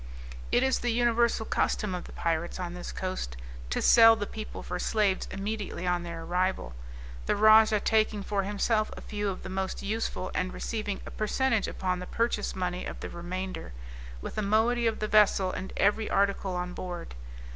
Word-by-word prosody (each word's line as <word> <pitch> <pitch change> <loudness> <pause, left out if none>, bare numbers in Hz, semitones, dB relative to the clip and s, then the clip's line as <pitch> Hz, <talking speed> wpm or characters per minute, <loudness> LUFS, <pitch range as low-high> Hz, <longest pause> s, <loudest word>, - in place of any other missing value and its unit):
It 245 - +4
is 265 0 +2
the 245 - -1
universal 235 -1 +2
custom 210 -3 0
of 180 - -4
the - - -11
pirates, 170 +2 -2
on 175 -1 -4
this 180 0 -6
coast, 185 - -4 0.3
to - - -1
sell 225 -1 +8
the 205 -2 -3
people 215 +1 -7
for - - -4
slaves 205 -4 +1
immediately 200 -2 -4
on 180 -1 +1
their 170 -1 -6
arrival, 180 - -1 0.5
the - - +2
rajah 215 0 +6
taking 215 -2 +2
for 200 0 0
himself 210 +2 0
a - - -8
few 205 -1 -3
of 190 - -5
the 185 - -6
most 190 0 -3
useful, 205 -2 -2
and 185 0 -2
receiving 215 -3 -3
a - - -8
percentage 225 +1 +1
upon 185 -1 -2
the 180 - -7
purchase 230 -2 -1
money 180 -1 -2
of - - -6
the - - -6
remainder, 185 - -5 0.5
with - - -6
a - - +1
moiety 225 +3 +2
of 225 - 0
the 215 - -2
vessel 205 -3 +4
and 190 - -5
every 210 +2 +2
article 195 -1 +1
on 180 0 -3
board. 175 -2 -6
200 Hz, 185 wpm, -29 LUFS, 185-220 Hz, 0.5 s, sell